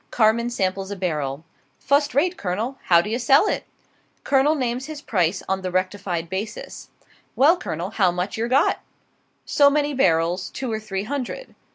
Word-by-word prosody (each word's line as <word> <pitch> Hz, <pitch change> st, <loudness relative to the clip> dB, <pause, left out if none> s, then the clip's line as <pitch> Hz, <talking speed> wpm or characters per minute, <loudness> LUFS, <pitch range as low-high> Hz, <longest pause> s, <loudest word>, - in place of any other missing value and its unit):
Carman 230 Hz, +1 st, +2 dB
samples 195 Hz, -4 st, -2 dB
a 200 Hz, -, -4 dB
barrel. 155 Hz, -5 st, -3 dB, 0.3 s
"Fust 285 Hz, -1 st, +1 dB
rate, 350 Hz, +6 st, +2 dB
Colonel, 220 Hz, -, -3 dB
how 170 Hz, -1 st, +5 dB
d'ye 215 Hz, +6 st, -2 dB
sell 275 Hz, -, +4 dB
it?" -, -, -2 dB, 0.6 s
Colonel 280 Hz, +3 st, +3 dB
names 255 Hz, 0 st, -2 dB
his 310 Hz, -2 st, -7 dB
price 185 Hz, -, 0 dB
on 190 Hz, 0 st, -1 dB
the 185 Hz, -, -3 dB
rectified 185 Hz, -2 st, -2 dB
basis. 195 Hz, +5 st, -6 dB, 0.5 s
"Well, 300 Hz, +6 st, +5 dB
Colonel, 180 Hz, -, -5 dB
how 195 Hz, -5 st, +3 dB
much 180 Hz, +3 st, -3 dB
yer 225 Hz, +1 st, -1 dB
got?" 270 Hz, +5 st, +2 dB, 0.7 s
"So 285 Hz, -1 st, +5 dB
many 290 Hz, 0 st, 0 dB
barrels 175 Hz, -6 st, +1 dB
two 260 Hz, -3 st, -5 dB
or 220 Hz, -, -2 dB
three 195 Hz, -3 st, -4 dB
hundred." 285 Hz, -, -5 dB
215 Hz, 165 wpm, -23 LUFS, 185-270 Hz, 0.7 s, how